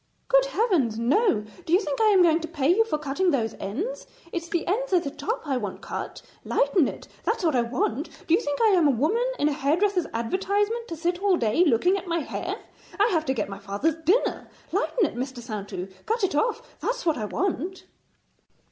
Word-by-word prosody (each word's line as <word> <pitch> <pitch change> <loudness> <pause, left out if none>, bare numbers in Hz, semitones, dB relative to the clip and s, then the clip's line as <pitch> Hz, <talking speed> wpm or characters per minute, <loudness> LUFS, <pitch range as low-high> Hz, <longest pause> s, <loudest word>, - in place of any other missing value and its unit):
'Good - - +5
Heavens, 365 - +1
no! 240 - +2 0.2
Do 325 - -3
you 365 - +7
think 300 -3 -2
I - - +5
am 395 -4 +6
going 330 -1 +4
to 325 - -5
pay 310 -2 +1
you 450 - +5
for 450 -9 -2
cutting 300 +5 0
those 230 -8 0
ends? 335 - -4 0.2
It's 335 -1 -4
the 340 - -1
ends 470 +7 -1
at 355 - +4
the 280 - -4
top 445 - -3
I 275 -3 0
want 205 -6 -5
cut. - - -6 0.2
Lighten 385 - +2
it; - - -7 0.2
that's 445 -3 -1
what 315 -4 +2
I 245 - +4
want. 240 +4 -1 0.2
Do 325 - +1
you 355 - +4
think 290 0 -2
I 445 - +6
am 355 -6 +4
a - - +4
woman 305 - +2 0.2
in 290 - +2
a - - +2
hairdresser's 350 +7 +1
advertisement 405 - -1
to 335 - -5
sit 350 +2 -1
all 395 -3 +3
day 230 +7 +3
looking 355 - +3
at 385 - -7
my 335 -1 0
hair? - - -4 0.4
I 415 +3 +5
have 320 -3 +1
to 265 - 0
get 215 - -1
my 195 0 -7
father's 205 +11 -1
dinner. 380 +10 +1 0.2
Lighten 460 -6 +1
it, - - -3
Mr. 260 +1 -4
Saintou; 205 -5 -5 0.2
cut 450 0 0
it 385 - +1
off; 460 +9 -1
that's - - -2
what 320 -6 +1
I 215 - -2
want.' 370 - -2
335 Hz, 220 wpm, -25 LUFS, 265-400 Hz, 0.4 s, you